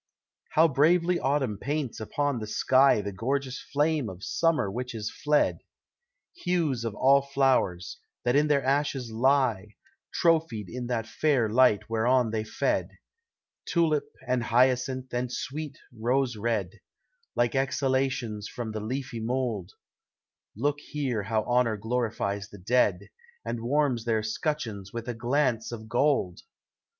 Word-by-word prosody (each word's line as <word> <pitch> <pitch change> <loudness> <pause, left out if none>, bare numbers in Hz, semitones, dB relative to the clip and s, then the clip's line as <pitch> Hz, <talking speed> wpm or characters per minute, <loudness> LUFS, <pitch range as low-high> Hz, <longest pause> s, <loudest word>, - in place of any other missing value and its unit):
How 160 +2 +6
bravely 170 +5 +3
Autumn 130 -7 0
paints 145 -5 -3
upon 140 +4 -1
the 110 - -5
sky 130 +1 +4
The 100 0 -4
gorgeous 130 +6 -2
fame 145 -3 +1
of 95 +1 -10
Summer 160 -12 +1
which 125 +2 -5
is 105 -1 -4
fled! 150 0 +1 0.8
Hues 165 - 0
of 115 -3 -3
all 135 +4 +5
flow'rs, 135 -11 +1 0.3
that 120 +1 +2
in 150 +1 +4
their 145 -3 +2
ashes 135 -3 0
lie, 115 -4 +1 0.4
Trophied 160 - +1
in 125 0 -5
that 120 -3 -1
fair 130 0 +1
light 120 -3 +4
whereon 115 +1 +2
they 110 -1 -1
fed, 110 - -1 0.8
Tulip, 160 -4 +1 0.2
and 125 -1 +1
hyacinth, 125 +1 +1
and 120 0 -1
sweet 150 +2 -5 0.2
rose 125 +2 0
red, 105 -4 -2 0.6
Like 120 -1 +2
exhalations 130 -5 0
from 115 -3 -5
the 110 - -4
leafy 125 +1 -4
mould, 115 -5 -2 0.8
Look 145 +5 0
here 135 -7 -3
how 110 +2 -1
honor 120 -2 +1
glorifies 110 -3 -2
the 100 - -12
dead, 100 -2 +1 0.3
And 120 - -3
warms 130 -2 +1
their 110 -2 +1
scutcheons 110 -5 -3
with 115 0 -6
a 120 - -2
glance 120 0 0
of 110 -2 -7
gold! 120 -7 +1
125 Hz, 135 wpm, -27 LUFS, 110-140 Hz, 0.8 s, How